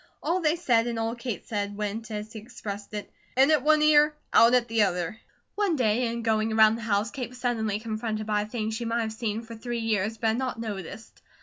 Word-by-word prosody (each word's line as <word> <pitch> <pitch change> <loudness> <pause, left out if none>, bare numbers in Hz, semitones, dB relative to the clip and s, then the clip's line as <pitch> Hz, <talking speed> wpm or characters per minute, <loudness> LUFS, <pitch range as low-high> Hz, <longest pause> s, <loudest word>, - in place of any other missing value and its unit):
All 345 +4 +1
they 310 0 +2
said 240 -9 +2
and 235 -1 -2
all 225 0 -1
Kate 235 -2 -5
said, 205 -2 -3
went, 215 +2 -4
as 215 +1 -6
he 220 - -6
expressed 210 -3 -8
it, 205 - -6 0.3
"in 270 +3 +6
at 305 -3 +4
one 305 +2 +4
ear, 300 0 +5 0.2
out 235 +2 +7
at 245 -1 +2
the 225 -1 +1
other." 180 +1 0 0.3
One 400 -5 +1
day 240 -2 +2
in 235 0 -3
going 220 -1 +1
around 220 0 +6
the 230 - -7
house 215 0 0
Kate 260 -4 -5
was 250 - -13
suddenly 220 -4 -1
confronted 215 -1 -3
by 210 -1 +1
a - - -3
thing 220 -1 -3
she 220 +2 -3
might 230 0 0
have 220 -1 -3
seen 220 0 -3
for 230 0 -10
three 240 +1 -4
years, 220 0 0
but 225 0 +1
had 220 - 0
not 255 -3 -3
noticed. 205 -1 -7
225 Hz, 235 wpm, -27 LUFS, 215-245 Hz, 0.3 s, out